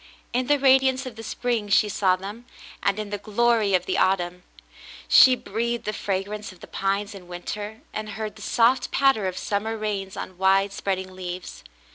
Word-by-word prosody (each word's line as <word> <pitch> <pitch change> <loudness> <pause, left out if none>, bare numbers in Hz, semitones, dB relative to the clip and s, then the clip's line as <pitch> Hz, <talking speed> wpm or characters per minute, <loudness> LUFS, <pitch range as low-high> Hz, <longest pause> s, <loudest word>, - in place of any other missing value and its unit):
In 250 +1 0
the 290 - +4
radi 265 -1 +5
ance 260 +1 -3
of 255 -3 -7
the 225 - -8
spring, 225 -1 -2
she 210 +2 +4
saw 195 -2 +2
them, 205 +6 -8 0.4
and 200 0 +1
in 210 -1 -5
the 205 - -3
glory 215 -1 +2
of 180 - 0
the 185 - 0
autumn; 180 -1 +1 0.7
she 260 -1 +8
breathed 235 +1 -3
the 215 - -2
fragrance 205 +2 -3
of 185 - -17
the - - -10
pines 200 +2 -2
in 185 -3 -11
winter 205 +5 -6
and 215 0 -4
heard 215 0 -5
the 215 - -13
soft 240 +4 +2
patter 270 -8 +3
of 185 - -4
summer 220 +2 -2
rains 200 -3 -3
on 185 -1 -7
widespread 195 0 +2
ing 185 0 -7
leaves. 180 -1 -7
205 Hz, 190 wpm, -24 LUFS, 190-230 Hz, 0.7 s, she